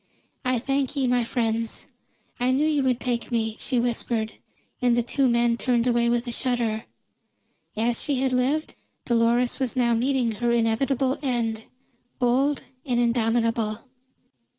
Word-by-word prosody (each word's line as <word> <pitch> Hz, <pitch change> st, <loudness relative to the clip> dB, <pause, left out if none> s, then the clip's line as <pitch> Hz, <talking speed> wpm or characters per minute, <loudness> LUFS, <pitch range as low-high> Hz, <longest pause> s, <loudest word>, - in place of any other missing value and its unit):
"I 255 Hz, -1 st, +1 dB
thank 270 Hz, +3 st, -1 dB
ye, 275 Hz, -2 st, +1 dB
my 245 Hz, -1 st, +2 dB
friends; 230 Hz, -1 st, -2 dB, 0.5 s
I 245 Hz, +1 st, +1 dB
knew 270 Hz, +4 st, +2 dB
you 305 Hz, -2 st, +2 dB
would 255 Hz, -2 st, +1 dB
take 240 Hz, -1 st, -2 dB
me," 225 Hz, -2 st, 0 dB
she 255 Hz, -3 st, 0 dB
whispered, 235 Hz, -2 st, -1 dB, 0.5 s
and 245 Hz, -1 st, +3 dB
the 240 Hz, -, +2 dB
two 265 Hz, +3 st, +1 dB
men 235 Hz, -1 st, +2 dB
turned 240 Hz, -1 st, +1 dB
away 235 Hz, -1 st, +2 dB
with 240 Hz, +1 st, +1 dB
a 240 Hz, -, -3 dB
shudder. 235 Hz, -3 st, -1 dB, 0.9 s
As 230 Hz, +1 st, +1 dB
she 285 Hz, -, 0 dB
had 260 Hz, 0 st, 0 dB
lived, 270 Hz, +5 st, 0 dB, 0.3 s
Dolores 235 Hz, +2 st, +2 dB
was 260 Hz, -2 st, -1 dB
now 240 Hz, -2 st, +2 dB
meeting 250 Hz, 0 st, +1 dB
her 240 Hz, +1 st, +1 dB
inevitable 240 Hz, +3 st, +1 dB
end, 230 Hz, -5 st, -1 dB, 0.5 s
bold 265 Hz, +4 st, +1 dB, 0.2 s
and 245 Hz, -4 st, 0 dB
indomitable. 230 Hz, -2 st, +1 dB
240 Hz, 150 wpm, -25 LUFS, 230-255 Hz, 0.9 s, and